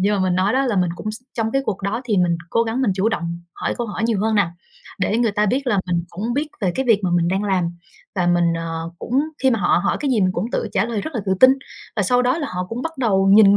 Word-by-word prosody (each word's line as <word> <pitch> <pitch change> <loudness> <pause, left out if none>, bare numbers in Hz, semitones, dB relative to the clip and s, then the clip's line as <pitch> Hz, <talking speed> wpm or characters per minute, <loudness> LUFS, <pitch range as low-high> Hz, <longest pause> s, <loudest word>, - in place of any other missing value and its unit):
nhưng 205 +2 +2
mà - - -1
mình 185 -1 +1
nói 190 +3 +2
đó 265 +1 +2
là 230 - 0
mình 180 -2 +2
cũng 215 +4 -4
x 220 - -7
trong 225 -1 -1
cái 270 0 +1
cuộc 200 -5 -3
đó 205 +4 -1
thì 215 -5 0
mình 175 -1 +2
cố 230 - +3
gắng 230 +3 -1
mình 210 -7 +2
chủ 195 +3 +1
động 170 -6 -3
hỏi - - -2
câu 240 - -1
hỏi 215 +1 -4
nhiều 225 -4 +1
hơn 220 +1 +1
nà, 195 -5 +2 0.5
để 210 +4 +1
người 230 -3 +2
ta 210 +1 +1
biết 260 +6 0
là 205 -5 +2
mình 175 -1 0
cũng 210 +7 -3
biết 295 +2 -1
về 185 -3 +1
cái 265 -1 -1
việc 220 -4 +4
mà 180 - +1
mình 170 0 +2
đang 190 +3 0
làm. 190 -3 +1 0.5
Và 180 -3 0
mình, 175 0 +3
ờ, 165 0 -4
cũng 255 +4 0 0.2
khi 265 - +5
mà 230 - +1
họ 175 - +3
hỏi - - +1
cái 285 -2 0
gì 230 - +2
mình 185 -1 +2
cũng 195 +7 -3
tự - - -1
trả - - +2
lời 230 -3 -2
rất 315 +7 -6
là 230 - -1
tự 190 - +2
tin, 255 - +9 0.5
và - - +2
sau 250 0 +3
đó 255 +5 +1
là 295 - -2
họ 180 0 -3
cũng 235 +2 -4
bắt 325 +2 -3
đầu 195 -6 +2
nhìn 200 0 +7
210 Hz, 305 wpm, -21 LUFS, 185-235 Hz, 0.5 s, tin